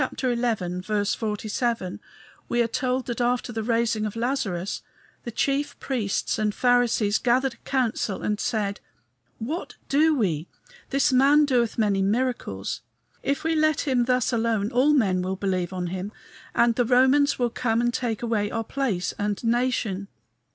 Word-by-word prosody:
47, 215 -1 -1 0.5
we 240 - 0
are 235 - +3
told 255 +2 -1
that 240 0 -3
after 245 0 0
the 225 - -2
raising 230 -1 +1
of 210 - -7
Lazarus 225 -7 -2 0.4
the 235 - -4
chief 280 +5 -1
priests 225 -4 -1
and 210 -1 0
Pharisees 245 -4 +3
gathered 255 +1 +2
a - - -20
council 235 -7 -1
and 210 0 -1
said, 205 -4 -1 0.6
"What 300 +11 -5
do 310 +3 +4
we? 170 - 0 0.4
this 275 -1 +2
man 280 +4 +5
doeth 245 -5 +1
many 205 -3 +2
miracles. 245 +6 -1 0.4
If 280 0 -1
we 325 0 +1
let 310 -1 +2
him 255 -4 +1
thus 250 0 +1
alone 225 -2 0
all 265 +4 +4
men 190 -9 +2
will 185 +1 -2
believe 185 -2 -1
on 180 -1 -3
him, 190 +2 -4 0.4
and 235 0 +4
the 245 +1 +1
Romans 265 +4 +4
will 245 -2 0
come 230 -1 0
and 240 0 +1
take 235 -3 -2
away 215 -3 0
our 225 +1 -2
place 225 -7 -2
and 205 +1 -2
nation." 230 -5 0
235 Hz, 150 wpm, -25 LUFS, 205-255 Hz, 0.6 s, man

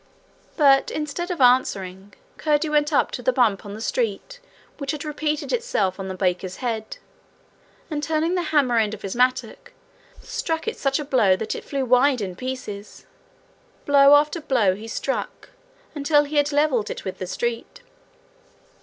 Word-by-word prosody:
But, 275 -3 +5
instead 310 +4 -4
of 360 - -3
answering, 195 -6 +1 0.2
Curdie 305 0 +1
went 295 0 +2
up 290 - +2
to - - -5
the - - +2
bump 220 - +2
on 200 - -7
the 220 - -8
street - - -2 0.4
which 280 -2 -5
had 300 0 -6
repeated 300 +5 -2
itself 475 - -1
on 190 - -4
the 190 - -5
baker's 185 0 -1
head, 225 -4 -4 0.9
and 295 -1 -2
turning 320 +2 0
the 365 - +1
hammer 260 -6 +3
end 215 -1 0
of 205 - -16
his 195 - -4
mattock, 255 +1 0 0.5
struck 320 +2 -3
it 455 - -1
such 275 -1 0
a 300 - -4
blow 225 -9 +3
that 215 +3 -4
it - - -7
flew 275 -2 -2
wide 255 +2 +4
in 190 -4 -4
pieces. 235 -4 -7 0.8
Blow 280 0 +7
after 300 +3 +2
blow 240 -10 +2
he 210 +4 -9
struck 270 +4 -4 0.4
until 295 0 +3
he 295 +1 -4
had 290 +1 +2
levelled 290 -6 +1
it - - -6
with 190 - -5
the 185 - -4
street. 235 +5 -4
270 Hz, 170 wpm, -23 LUFS, 215-300 Hz, 0.9 s, Blow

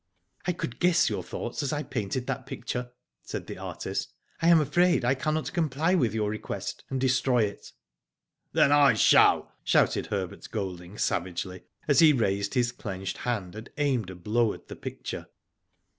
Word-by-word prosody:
I - - +3
could 140 -8 -5
guess 170 -6 +4
your 100 -3 -2
thoughts 115 - -5
as 140 - -1
I 150 0 -1
painted 120 0 -3
that 135 -1 -4
picture," 125 -2 -4 0.3
said - - -6
the - - -8
artist. - - -4 0.2
" - - -28
I 165 - +2
am 170 -1 +7
afraid 175 0 +3
I 125 - +4
cannot 155 +3 -2
comply 160 0 +1
with 120 - +2
your 105 -2 0
request, 110 - -5
and 135 - -2
destroy 130 -2 +2
it." 100 -1 -5 0.8
Then 140 - +4
I 145 -2 +6
shall," - - +5
shouted - - +2
Herbert 95 -4 -4
Golding, 95 -2 -5
savagely, 90 +1 -2 0.2
as 145 - +4
he 160 -2 +8
raised 100 -5 0
his 120 -1 +2
clenched 95 -5 -5
hand 100 -6 -2
and 110 +3 -8
aimed 130 -9 0
a 95 - -7
blow 110 +5 +1
at - - -14
the - - -6
picture. - - -6
125 Hz, 175 wpm, -27 LUFS, 100-145 Hz, 0.8 s, he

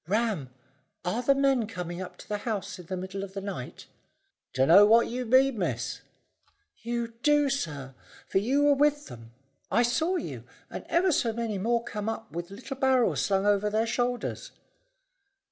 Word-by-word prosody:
"Ram, 205 - 0 0.6
are 210 +7 -1
the 275 +3 +3
men 270 -5 +2
coming 180 -4 -6
up 185 - -8
to - - -13
the 210 -1 -2
house 205 -3 -4
in 175 - -11
the 185 - -3
middle 190 +2 -5
of 195 0 -9
the - - -2
night?" 200 0 -7 0.7
"Dunno 160 +10 +6
what 225 +3 +6
you 250 +1 -4
mean, 260 -1 +4
miss." 125 -10 -2 0.8
"You 235 0 -2
do, 295 0 +3
sir, 145 - -4 0.3
for - - +2
you 265 +8 +1
were 290 0 +5
with 290 +1 +2
them. 115 -2 -11 0.4
I 240 - +3
saw 320 +10 +1
you - - -5 0.3
and - - -7
ever 365 +2 +3
so 235 -6 +1
many 225 -3 -3
more 235 +3 +1
come 210 -1 -4
up 225 0 -6
with 170 +1 -5
little 250 +7 -8
barrels 260 -3 +2
slung 195 0 +1
over 205 0 +2
their 220 +2 +1
shoulders." 245 - -2
225 Hz, 175 wpm, -28 LUFS, 190-255 Hz, 0.8 s, Dunno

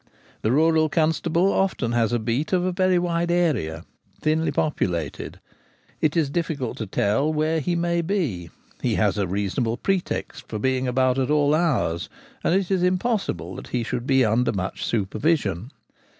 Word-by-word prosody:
The 110 - +1
rural 160 +2 +3
constable 165 +3 +1
often 190 -11 0
has 120 -2 +1
a 120 - +2
beat 120 - -2
of 180 0 +1
very 185 -1 +3
wide 170 -1 0
area, 125 - 0 0.3
thinly 160 +1 +1
populated: 85 - -2 0.6
it 155 +1 +1
is 150 -4 +1
difficult 150 -7 -2
to 110 - -3
tell 110 +10 +1
where 155 +1 +1
he 175 +4 -1
may 170 0 +1
be; 160 - -2 0.3
he - - +1
has - - +1
a 100 - 0
reasonable 105 +5 -1
pretext 180 -8 -2
for 110 - -4
being 130 +3 0
about 130 +1 +2
at 130 - 0
all 150 -1 +3
hours, 150 - 0 0.3
and 175 - +2
it 195 -1 0
is 190 -2 +2
impossible 185 +5 0
that - - -8
he 120 -2 -1
should 120 +2 -4
be 135 -2 +4
under 115 +3 +2
much 95 -1 -4
supervision. 110 - 0
150 Hz, 165 wpm, -24 LUFS, 115-170 Hz, 0.6 s, be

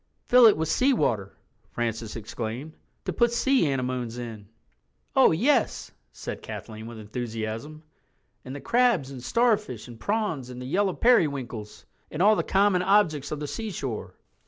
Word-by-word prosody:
"Fill 245 -1 +8
it 215 - +5
with 160 0 -1
seawater," 155 - +1 0.4
Francis 115 -2 -3
explained, 115 +6 -5 0.3
"to 185 - -2
put 235 +7 +3
sea 255 - +2
anemones 125 -3 -2
in." 110 -4 -7 0.7
"Oh 265 - +7
yes," 235 - +1 0.2
said - - -7
Kathleen 110 0 -8
with 115 -1 -9
enthusiasm, 115 +6 -5 0.6
"and 130 +2 -7
the 145 - -7
crabs 235 - +2
and 130 -3 -9
starfish 210 - +1
and 120 -2 -11
prawns 200 - -2
and 125 0 -8
the 125 - -6
yellow 190 +7 +1
periwinkles—and 135 - -1
all 210 +4 +6
the - - +1
common 195 -2 +2
objects 175 -8 +2
of 150 - -4
the 150 - -4
seashore." 145 - -5
145 Hz, 145 wpm, -26 LUFS, -, 0.7 s, Fill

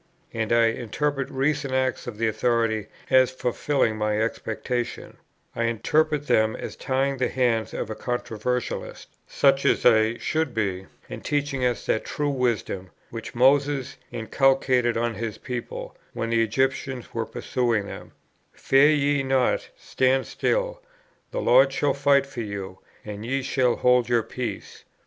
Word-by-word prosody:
And 110 -1 -2
I 115 0 +5
interpret 135 +4 -2
recent 140 0 -1
acts 130 -1 -1
of 115 -4 -6
that 115 +1 +1
authority 115 -1 0 0.2
as 130 -1 +6
fulfilling 130 -2 0
my 105 0 0
expectation; 115 +2 -3 0.4
I 115 - 0
interpret 150 +6 +1
them 110 -4 +2
as - - -7
tying 135 +1 -1
the 130 - 0
hands 120 -4 0
of 110 - -4
a - - -4
controversialist, 120 0 -3 0.2
such 135 -1 +3
as - - +2
I 110 -1 +4
should 160 -3 -1
be, 95 -4 -2 0.2
and - - -8
teaching 145 -2 -1
us 125 -1 0
that 110 - 0
true 145 -1 -2
wisdom, 120 -8 -1 0.2
which 115 0 -7
Moses 135 +1 +2
inculcated 125 0 +2
on 120 0 0
his 110 0 -5
people, 125 -1 -6 0.2
when 115 0 -3
the 115 0 +3
Egyptians 130 +2 -1
were 115 -1 -2
pursuing 115 -5 -1
them, - - -9 0.4
"Fear 135 +2 +4
ye 145 -2 +2
not, 135 -1 +1
stand 130 0 +1
still; - - -1 0.5
the - - -3
Lord - - +5
shall 145 -1 +1
fight 140 0 +3
for 140 -3 -6
you, 100 -3 -6 0.3
and 105 0 -7
ye 135 +3 -1
shall 125 -2 +1
hold 125 -1 +3
your 120 -2 +3
peace." 125 +1 -6
125 Hz, 150 wpm, -25 LUFS, 115-135 Hz, 0.5 s, as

